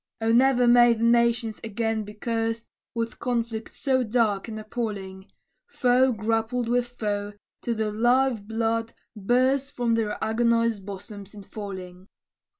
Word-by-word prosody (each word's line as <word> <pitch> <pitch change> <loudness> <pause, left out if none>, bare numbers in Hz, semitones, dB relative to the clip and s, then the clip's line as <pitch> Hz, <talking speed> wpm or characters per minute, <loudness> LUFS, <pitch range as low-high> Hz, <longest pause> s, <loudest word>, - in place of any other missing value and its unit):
O 225 0 +1
ne'er 250 +1 +4
may 240 0 +7
the 225 - -3
nations 235 -1 +2
again 225 0 -2
be 210 0 -10
cursed 225 +1 -2 0.3
With 230 -1 -3
conflict 230 -2 -2
so 260 -2 0
dark 220 -3 +1
and 220 -1 -6
appalling! 205 -4 -5 0.4
Foe 255 - +3
grappled 225 +2 -1
with 245 +1 +1
foe, 205 -4 -3 0.3
till 235 - -2
the 215 -1 -1
life 240 +2 +2
blood 225 +1 -2 0.2
burst 255 +6 +1
From 240 -2 0
their 220 -2 0
agonized 230 -2 +1
bosoms 200 +1 -9
in 205 - -10
falling. 190 -3 -8
225 Hz, 140 wpm, -25 LUFS, 210-240 Hz, 0.4 s, may